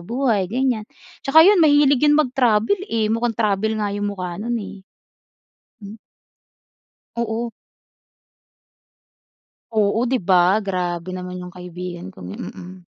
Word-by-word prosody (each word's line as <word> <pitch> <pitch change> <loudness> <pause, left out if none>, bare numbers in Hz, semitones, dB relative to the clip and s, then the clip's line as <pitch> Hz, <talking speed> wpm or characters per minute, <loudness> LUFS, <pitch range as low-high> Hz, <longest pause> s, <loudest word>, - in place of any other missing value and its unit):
buhay 225 -3 0
ganiyan, 250 -2 0 0.4
tsaka 320 +4 +6
yun 395 -3 +6
mahilig 290 -3 +4
yun 295 0 +5
mag-travel, 250 - +2
eh, 225 -1 +1
mukhang 225 +1 -1
travel 215 0 0
nga 205 -1 -2
yung 205 0 -2
mukha 185 -3 -5
no'n 235 +1 -2
eh. 200 -2 -9 1.0
Hmm. 205 +1 -10 1.2
Oo. 235 0 -2 2.3
Oo 210 +1 +2
di 260 - +2
ba, 185 -1 +3
grabe 180 -1 -3
naman 180 0 -6
yung 180 - -11
kaibigan 180 - -8
kong 90 -1 -11
'yon - - -7
mm. 185 +1 -11
215 Hz, 125 wpm, -21 LUFS, 185-245 Hz, 2.3 s, tsaka